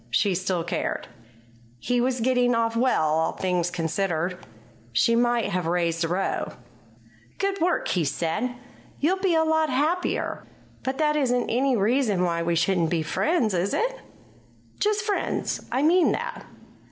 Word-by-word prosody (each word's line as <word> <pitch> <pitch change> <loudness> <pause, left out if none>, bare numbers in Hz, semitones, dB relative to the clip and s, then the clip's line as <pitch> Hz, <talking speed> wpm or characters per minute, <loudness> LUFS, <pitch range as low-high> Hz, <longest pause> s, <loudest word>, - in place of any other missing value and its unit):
She 195 - +2
still 180 -1 -1
cared. 170 - -3 0.7
He 245 - 0
was 250 -1 0
getting 245 0 +2
off 230 0 0
well, 245 -7 +2
all 160 +1 +1
things 180 -2 0
considered. 175 +1 -1 0.6
She 230 - +3
might 240 -1 +2
have 180 -3 -1
raised 170 -1 0
a - - +1
row. 180 +3 -2 0.8
"Good 395 -2 -1
work!" 355 +2 +1
he 180 - +1
said. 175 - -2 0.4
"You'll 360 +6 +1
be 380 -3 +2
a 320 - +4
lot 315 -1 +2
happier. 305 +8 0 0.4
But 265 0 -3
that 300 -1 +2
isn't 250 -4 +1
any 255 +1 +2
reason 215 -2 +2
why 170 -1 0
we 170 0 0
shouldn't 170 -1 +2
be 165 -1 0
friends, 240 - +1
is 185 +2 0
it? - - -1 0.8
Just 420 0 +1
friends; 415 -1 -1
I 260 +3 +1
mean 345 +3 +4
that. - - -5
230 Hz, 155 wpm, -25 LUFS, 175-285 Hz, 0.8 s, a